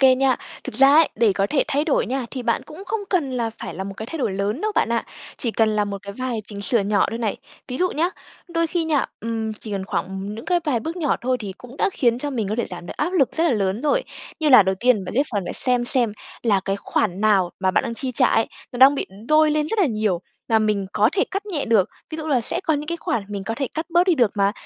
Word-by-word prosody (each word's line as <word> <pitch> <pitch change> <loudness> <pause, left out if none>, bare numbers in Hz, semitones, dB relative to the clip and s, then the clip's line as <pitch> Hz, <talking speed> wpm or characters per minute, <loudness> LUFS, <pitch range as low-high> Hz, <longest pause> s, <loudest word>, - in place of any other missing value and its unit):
kê 265 -1 +7
nha. 260 -1 +2 0.3
Thực - - -6
ra 270 +1 +7
ấy, 320 -1 +6
để 220 -2 +3
có 195 +1 +1
thể 275 +4 +2
thay 290 +2 +1
đổi 305 - +1
nha, 260 -1 -2
thì 255 -2 -5
bạn 235 +3 0
cũng 310 +8 -11
không 435 +3 -2
cần 320 -9 +1
là 230 -2 -1
phải - - -6
là 190 - -4
một 195 - -6
cái 220 - -6
thay 325 +4 -6
đổi 220 - 0
lớn 200 - -2
đâu 430 0 -1
bạn - - +2
ạ, 230 - 0 0.3
chỉ 235 - -1
cần 220 0 +2
là 210 - +2
một 200 -1 -5
cái 200 0 -7
vài 255 0 -3
chỉnh 200 -1 -8
sửa 230 +2 +2
nhỏ 200 +1 +2
thôi 230 - -4
này. 220 -3 -1 0.3
Ví 250 - -4
dụ 365 0 +2
nhá 330 +4 +1 0.4
đôi 335 -1 0
khi 335 0 -1
nha, 305 -4 +1
ừm, 225 0 -2
chỉ 215 0 -10
cần 195 -1 -2
khoảng 190 - -1
ừm, 195 +2 -5
những 225 - -8
cái 355 -1 +2
vài 255 -8 +1
bước 325 +7 -5
nhỏ 315 -6 +1
thôi, 255 +1 0
thì 200 -3 -5
cũng 250 +2 -12
đã 395 - +1
khiến 240 -2 +2
cho 290 +2 -3
mình 225 -7 -2
có 215 - -1
thể 235 - +1
giảm 175 -1 -8
được - - -8
áp 335 +5 -1
lực 285 -8 +3
rất 325 - +1
là 335 - +3
lớn 200 +1 0
rồi. - - +2 0.4
Như 310 - +2
là 255 -7 +9
đầu 190 0 0
tiên 235 -6 +3
bạn - - -6
sẽ 275 - +4
phần 205 -3 0
phải - - -3
xem 250 -1 +1
xem, 240 -4 +2 0.3
là 205 -5 +3
cái 195 - 0
khoản 200 -1 -1
nào 200 -5 +3
mà 190 - +2
bạn - - +1
đang 230 - -3
chi 255 +1 -4
trả 255 +1 +4
ấy, 225 - +2 0.3
nó 245 - -6
đang 270 +2 +8
bị - - -2 0.2
đôi 305 0 +5
lên 300 0 +1
rất 450 - -2
là 370 - +5
nhiều 215 -7 0 0.3
và 225 - +4
mình 210 -3 0
có 215 - +4
thể 400 - +2
cắt 395 +2 -3
nhẹ 335 -9 -2
được, 220 -5 +3 0.2
ví 315 - -4
dụ 315 - -5
là 275 -5 +2
sẽ 230 - -2
có 315 - +2
những 295 +1 -3
cái 340 - -2
khoản 235 -9 -2
mình 200 -2 -4
có 225 - -2
thể 275 -1 -1
cắt 320 +1 -3
bớt 345 +1 +4
đi 360 - +4
được 240 -8 +3
mà. 200 0 +2
240 Hz, 295 wpm, -22 LUFS, 210-300 Hz, 0.4 s, là